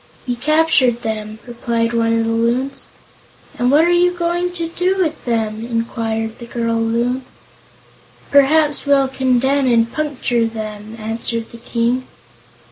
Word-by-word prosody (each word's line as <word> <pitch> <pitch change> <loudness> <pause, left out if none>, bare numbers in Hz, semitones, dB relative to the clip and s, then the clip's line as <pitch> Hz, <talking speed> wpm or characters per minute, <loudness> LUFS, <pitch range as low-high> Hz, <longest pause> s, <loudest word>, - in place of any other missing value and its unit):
"We 245 - 0
captured 270 -3 +2
them," 215 -1 -4
replied 235 -1 -2
one 230 0 +2
of 225 - +1
the 225 - 0
Loons. 240 +4 -1 0.7
"And 245 0 +2
what 300 +4 +5
are - - +2
we 350 0 +4
going 350 0 -1
to 335 -2 -3
do 365 +3 0
with 330 -5 -1
them?" 220 -2 -1
inquired 230 -1 -3
the 235 - -9
girl 230 -1 -1
Loon. 240 +3 0 1.1
"Perhaps 290 +1 +3
we'll 275 -1 +4
condemn 265 +1 +1
'em - - +3
and 230 0 +2
puncture 250 -6 0
'em," 215 0 -6
answered 225 +1 -3
the 235 - -11
King. 240 +2 -1
240 Hz, 145 wpm, -18 LUFS, 230-285 Hz, 1.1 s, what